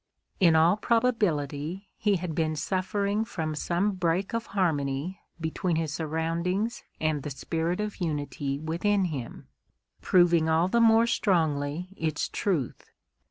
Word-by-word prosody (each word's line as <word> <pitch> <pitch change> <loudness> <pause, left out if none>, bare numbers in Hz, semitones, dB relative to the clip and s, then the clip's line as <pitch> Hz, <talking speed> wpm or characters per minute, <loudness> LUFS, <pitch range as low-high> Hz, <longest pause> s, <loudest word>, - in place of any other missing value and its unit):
In 170 -5 +5
all 165 +5 +5
probability 195 - 0
he 210 -2 +1
had 175 -2 -3
been 155 0 0
suffering 200 +5 -1
from 160 -8 -3
some 175 +6 0
break 185 +1 -1
of 230 0 -2
harmony 160 -2 -1 0.2
between 160 +2 -1
his 160 -2 -1
surroundings 165 +8 -1 0.2
and 155 -2 0
the 145 - -5
spirit 165 +5 -2
of 210 0 -3
unity 145 -3 -2
within 175 +6 0
him, 140 -9 -6 0.5
proving 170 -3 +4
all 160 +2 +3
the 235 +5 +2
more 225 0 +6
strongly 165 -6 0
its 155 -2 -1
truth. 165 - -2
170 Hz, 130 wpm, -27 LUFS, 155-195 Hz, 0.5 s, more